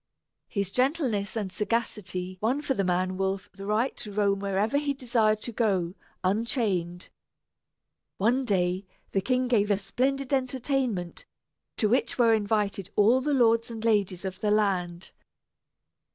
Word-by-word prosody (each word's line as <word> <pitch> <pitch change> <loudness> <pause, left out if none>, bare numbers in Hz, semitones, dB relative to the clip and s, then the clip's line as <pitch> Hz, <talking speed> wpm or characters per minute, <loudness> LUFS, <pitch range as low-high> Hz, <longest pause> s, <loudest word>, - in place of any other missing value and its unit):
His 200 -2 -2
gentleness 250 - 0
and 205 -4 -2
sagacity 185 -4 -2
won 255 +7 0
for 285 - 0
the 200 - 0
man 185 +1 0
wolf 195 0 -2
the 195 0 -8
right 220 +5 +1
to 210 - -7
roam 200 -1 +1
wherever 200 +7 +1
he 285 -1 -1
desired 230 -5 +1
to 240 - -4
go, 195 -7 0 0.3
unchained. 190 -4 -1 1.1
One 240 +7 +2
day 185 -3 0 0.2
the 195 - +1
king 255 +4 +1
gave 215 -4 +2
a 205 - +3
splendid 270 +6 -1
entertainment, 255 -8 -1 0.5
to 215 - +2
which 245 +5 +1
were 230 -2 +5
invited 205 -3 0
all 230 +5 +5
the 290 +1 +1
lords 230 -2 +3
and 225 -1 -6
ladies 200 -4 +1
of 190 0 -5
the 210 - 0
land. 190 -4 0
210 Hz, 145 wpm, -27 LUFS, 195-245 Hz, 1.1 s, were